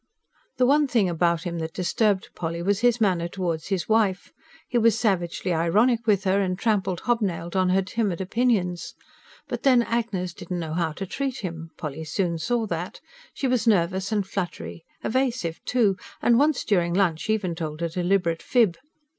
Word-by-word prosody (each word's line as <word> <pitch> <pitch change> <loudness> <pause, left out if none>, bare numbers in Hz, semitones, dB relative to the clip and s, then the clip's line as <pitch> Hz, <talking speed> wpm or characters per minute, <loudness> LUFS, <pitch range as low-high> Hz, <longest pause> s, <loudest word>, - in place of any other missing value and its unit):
The 250 - +4
one 290 +3 +4
thing 230 -7 +2
about 170 0 +1
him 170 -2 -3
that 160 0 -5
disturbed 195 +2 +1
Polly 170 0 -4
was 200 +2 +1
his 245 0 +3
manner 180 -6 +2
towards 170 -3 -3
his 190 -4 -1
wife: 215 -4 +1 0.3
he 245 - +1
was 230 -1 +4
savagely 185 -4 0
ironic 220 +9 +2
with 200 -3 +3
her, 195 0 +2
and 185 -2 -1
trampled 195 -5 0
hobnailed 190 -8 -1
on 185 -1 +3
her 190 +1 +3
timid 195 -2 -1
opinions. 190 -3 0 0.5
But - - -4
then 255 -3 +5
Agnes 220 -7 -2
didn't 180 - -6
know 160 -2 -4
how 165 -2 0
to 195 - -5
treat 270 +6 -3
him, 165 -3 -6
Polly 155 0 -5
soon 170 +1 -1
saw 230 +7 0
that: 175 -2 -4 0.3
she 275 - -2
was 250 -2 +1
nervous 190 -1 +2
and 205 -3 +1
fluttery 120 - -5 0.2
evasive, 240 -9 -1
too; 215 -7 +2 0.2
and 235 0 +4
once 295 -1 +2
during 175 -4 +1
lunch 180 -1 +1
even 205 -5 0
told 160 -1 -5
a 170 - 0
deliberate 175 -1 0
fib. 215 -9 +2
190 Hz, 175 wpm, -25 LUFS, 170-225 Hz, 0.5 s, then